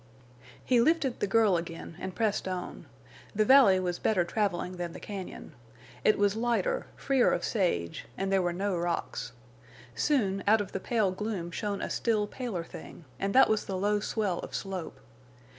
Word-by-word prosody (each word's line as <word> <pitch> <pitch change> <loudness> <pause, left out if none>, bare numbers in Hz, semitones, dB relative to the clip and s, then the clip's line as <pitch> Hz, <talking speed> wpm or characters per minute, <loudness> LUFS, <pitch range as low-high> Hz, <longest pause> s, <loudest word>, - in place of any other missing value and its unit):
He 245 -2 +4
lifted 290 -2 +2
the - - 0
girl 210 -3 +4
again 165 0 -6
and 185 0 -5
pressed 215 -4 0
on. 185 -1 -5 0.5
The 215 +1 +3
valley 260 -7 +7
afforded 180 -1 -2
better 195 -5 +2
traveling 185 -1 -1
than 175 -1 -4
the - - -8
cañon. 195 -6 -7 0.5
It 215 - +4
was 205 0 +2
lighter, 240 - 0
freer 270 -3 +2
of - - -1
sage, 170 - -1
and 195 0 -1
there 195 -1 +3
were 175 -1 0
no 195 +2 -1
rocks. 170 -7 -2 0.6
Soon, 195 - +1
out 220 +2 +6
of 205 -2 -4
the 195 - -3
pale 215 -2 +1
gloom 185 -3 -4
shone 205 +2 -3
a - - -3
still 215 -3 +1
paler 210 -6 -4
thing, 165 0 -11
and 195 0 -1
that 265 - +8
was 215 -1 +1
the 190 - -3
low 205 +2 +1
swell 205 -3 -1
of - - -7
slope. 185 -8 -5
200 Hz, 175 wpm, -29 LUFS, 180-220 Hz, 0.6 s, that